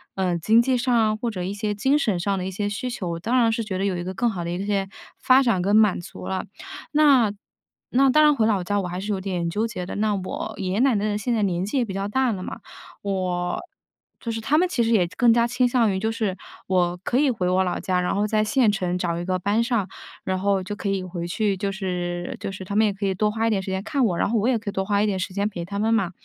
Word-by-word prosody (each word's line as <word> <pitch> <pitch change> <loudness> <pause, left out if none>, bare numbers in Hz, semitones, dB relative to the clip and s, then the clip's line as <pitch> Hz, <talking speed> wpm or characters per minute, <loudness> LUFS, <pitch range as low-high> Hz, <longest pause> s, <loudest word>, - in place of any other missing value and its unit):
呃， 185 -2 0
经 220 +7 +4
济 255 +2 +2
上 245 0 +1
啊， 215 -1 +2
或 235 +2 -2
者 185 -5 -4
一 190 +3 -3
些 210 0 -2
精 270 +8 +2
神 205 -9 0
上 195 +3 0
的 185 -1 -3
一 - - -2
些 205 +2 -3
需 215 +5 -3
求， 185 -7 -4
我 165 - -4
当 235 +9 0
然 230 -2 +4
是 225 0 -1
觉 190 -3 -4
得 195 - -1
有 190 -2 0
一 175 - -3
个 185 +1 -5
更 240 - +1
好 175 -4 -4
的 170 - -4
一 180 +3 -3
些 195 -2 -1 0.3
发 260 +1 +5
展 230 -8 +2
跟 200 +3 +2
满 215 -5 +4
足 - - -9
了。 190 0 -2 0.5
那 275 -8 +5 0.6
那 270 +2 +4
当 305 +3 +5
然 295 -1 +5
回 220 -4 +2
老 205 -4 +1
家， 205 +2 0
我 180 - -4
还 180 +1 -4
是 205 +2 -3
有 190 - -3
点 180 -3 -2
纠 210 +6 -1
结 185 -6 -5
的。 - - -6
那 210 0 +1
我 190 -1 -4
爷 190 -2 -3
爷 205 - 0
奶 260 -2 +4
奶 205 - 0
的 205 -1 0
现 235 +4 -1
在 220 - +1
年 180 -2 0
纪 215 +7 -2
也 245 - +2
比 195 - -6
较 195 +1 -2
大 260 +1 +1
了 185 - -5
嘛， - - -6 0.4
我 180 -3 -1 0.6
就 235 - -6
是 225 0 -4
他 295 +7 +2
们 360 +3 +3
其 245 -9 0
实 225 - 0
也 195 -6 +4
更 240 -2 +5
加 235 0 +3
倾 250 +1 +1
向 240 -3 +3
于 190 - -1
就 220 +2 -1
是 215 -4 -2 0.3
我 180 -1 +1
可 245 - +1
以 285 +1 +3
回 190 -6 -2
我 185 +1 +3
老 180 - -2
家， 180 -1 0
然 180 - 0
后 205 +1 +1
在 215 0 +1
县 235 +1 +3
城 180 -3 -1
找 170 -2 -1
一 175 - -3
个 185 0 -1
班 205 +5 +1
上， 230 -6 0 0.4
然 185 0 0
后 195 0 +1
就 190 +3 -5
可 205 -1 -3
以 195 -1 -1
回 175 -1 -5
去， 200 +3 0
就 195 +1 -2
是 180 -2 -3
就 - - -4
是 190 0 -8
他 200 - -5
们 220 +1 +4
也 205 - +1
可 200 +1 -4
以 195 - +1
多 210 +3 +1
花 225 +1 0
一 - - +3
点 205 -3 +1
时 190 0 -5
间 190 0 -1
看 280 -1 0
我， 185 -7 +1
然 - - +1
后 230 - +1
我 215 - +1
也 250 - +2
可 215 - -5
以 - - -5
多 190 - -1
花 200 +1 +1
一 - - +3
点 200 -3 0
时 185 - -4
间 200 +1 0
陪 175 -5 -5
他 200 +3 -5
们 220 +2 +2
嘛。 195 -5 +1
200 Hz, 320 characters per minute, -24 LUFS, 185-225 Hz, 0.6 s, 发